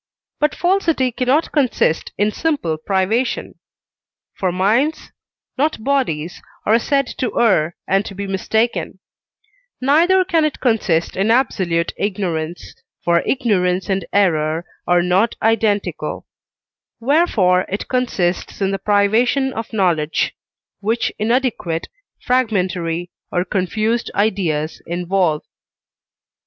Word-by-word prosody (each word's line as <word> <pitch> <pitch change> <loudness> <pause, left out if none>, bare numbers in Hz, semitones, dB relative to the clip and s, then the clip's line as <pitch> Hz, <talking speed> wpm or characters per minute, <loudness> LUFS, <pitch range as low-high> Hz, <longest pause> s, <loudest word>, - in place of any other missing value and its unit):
but 300 0 +1
falsity 340 -8 +1
cannot 260 +6 +1
consist 255 - +1
in 205 +1 +2
simple 285 - -1
privation 195 +9 -1 0.8
(for 185 -2 -1
minds, 225 - +1 0.5
not 295 -6 0
bodies, 180 - -1 0.2
are 220 +2 +4
said 275 +3 +1
to 250 -1 -3
err 180 -8 +3
and 195 +1 +2
to 195 - -8
be 200 +1 -4
mistaken), 220 +4 -1 0.8
neither 340 +8 +4
can 335 -4 +2
it 305 -2 -1
consist 210 -9 +1
in 195 +3 +1
absolute 185 -9 +1
ignorance, 175 -5 -3 0.3
for 170 0 +4
ignorance 190 -8 +1
and 195 0 0
error 165 -4 +1 0.2
are 175 0 +4
not 185 +6 +2
identical; 220 -2 0 0.7
wherefore 230 - +2
it 200 - -4
consists 210 -9 -1
in 195 -1 +1
the 195 - -2
privation 225 +6 +2
of 225 0 -5
knowledge, 170 -7 +1 0.5
which 225 +3 -1
inadequate, 220 -8 0 0.3
fragmentary, 180 -8 0 0.2
or 175 0 0
confused 215 +5 -1
ideas 175 -7 0
involve. 175 -2 0
205 Hz, 110 wpm, -19 LUFS, 180-250 Hz, 0.8 s, are